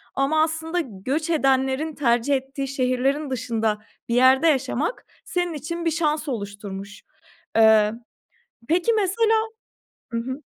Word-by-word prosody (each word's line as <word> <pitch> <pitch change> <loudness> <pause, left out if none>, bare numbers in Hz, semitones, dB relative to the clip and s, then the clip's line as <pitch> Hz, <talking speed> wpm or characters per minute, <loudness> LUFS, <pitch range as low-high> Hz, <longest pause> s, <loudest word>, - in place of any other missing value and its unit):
ama 305 +3 +2
aslında 320 +2 -2
göç 270 - -3
edenlerin 270 0 +1
tercih 240 +1 +2
ettiği 270 +1 -4
şehirlerin 270 +2 0
dışında 225 -4 -1 0.3
bir 235 - +1
yerde 260 +5 +5
yaşamak. 290 - 0 0.2
Senin 355 -1 -1
için 335 +3 -5
bir 330 - +2
şans 310 -1 0
oluşturmuş. 200 -3 -6 0.5
Eee, 220 -1 +5 0.8
peki 355 +7 +2
mesela 440 +2 +2 0.8
Hı 230 - -1
hı. 260 +5 -5
275 Hz, 120 wpm, -23 LUFS, 240-320 Hz, 0.8 s, yerde